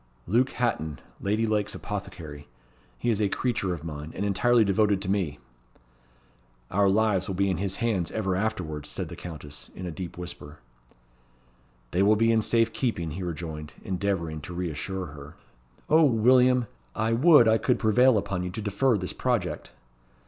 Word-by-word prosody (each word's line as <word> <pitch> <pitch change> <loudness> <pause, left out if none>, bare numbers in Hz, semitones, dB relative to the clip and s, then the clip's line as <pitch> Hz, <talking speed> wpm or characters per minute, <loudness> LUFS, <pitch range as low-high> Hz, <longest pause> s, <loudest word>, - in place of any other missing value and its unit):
"Luke 120 +8 +2
Hatton, 80 -12 -1 0.2
Lady 105 +3 +1
Lake's 105 -1 0
apothecary. 85 -8 -7 0.5
He 120 - 0
is 110 -1 0
a 100 - +2
creature 110 -5 -1
of 85 -4 -4
mine, 75 -1 -6
and 100 - -2
entirely 115 +3 +3
devoted 100 0 +2
to 95 - -1
me." 90 -8 -1 1.3
"Our 100 +1 +3
lives 100 -2 +2
will 95 - -3
be 100 +1 +1
in 90 - -1
his 95 0 -2
hands 105 -9 0
ever 95 -4 -1
afterwards," 90 -8 -3
said - - -4
the - - -7
Countess, 75 -4 -9
in 90 - -6
a 90 - -4
deep 90 +1 -7
whisper. 80 -4 -8 1.3
"They 90 - +1
will 105 +2 +5
be 115 +2 +3
in 110 -1 +3
safe 115 +1 +2
keeping," 85 - -1
he 90 +6 -5
rejoined, 80 -3 -5
endeavouring 90 -5 -2
to 90 +4 -8
reassure 90 +2 -3
her. 75 +2 -11 0.5
"O, 160 +2 +5
William! 125 0 +4 0.3
I 110 +1 +1
would 140 0 +6
I 110 0 +4
could 125 - +2
prevail 120 +2 +4
upon 100 -2 -2
you 90 - -3
to 90 - -6
defer 110 +4 +2
this 90 -1 -4
project." - - -2
100 Hz, 170 wpm, -27 LUFS, 85-110 Hz, 1.3 s, would